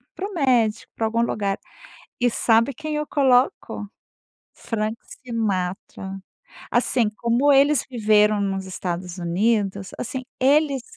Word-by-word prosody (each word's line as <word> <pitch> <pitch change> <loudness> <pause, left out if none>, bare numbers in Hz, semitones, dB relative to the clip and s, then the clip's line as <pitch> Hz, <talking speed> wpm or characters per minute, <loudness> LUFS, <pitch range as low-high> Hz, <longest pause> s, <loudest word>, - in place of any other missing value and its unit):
para 390 - -4
o - - -10
médico, 245 - +1
para 225 - -1
algum 230 +1 0
lugar 200 -4 -1 0.6
e 245 - +4
sabe 230 +3 +2
quem 305 +3 -5
eu 300 0 -2
coloco? 255 -6 +1 0.7
Frank 220 -1 -3 0.3
Sinatra. 195 -4 -3 0.5
Assim, 240 -2 +2
como 240 +5 +2
eles 280 0 +4
viveram 210 -3 +3
nos 195 -1 -2
Estados 180 -1 -5
Unidos, 195 +2 0
assim, 255 +2 -4 0.2
eles 280 0 +3
225 Hz, 120 wpm, -23 LUFS, 200-260 Hz, 0.7 s, e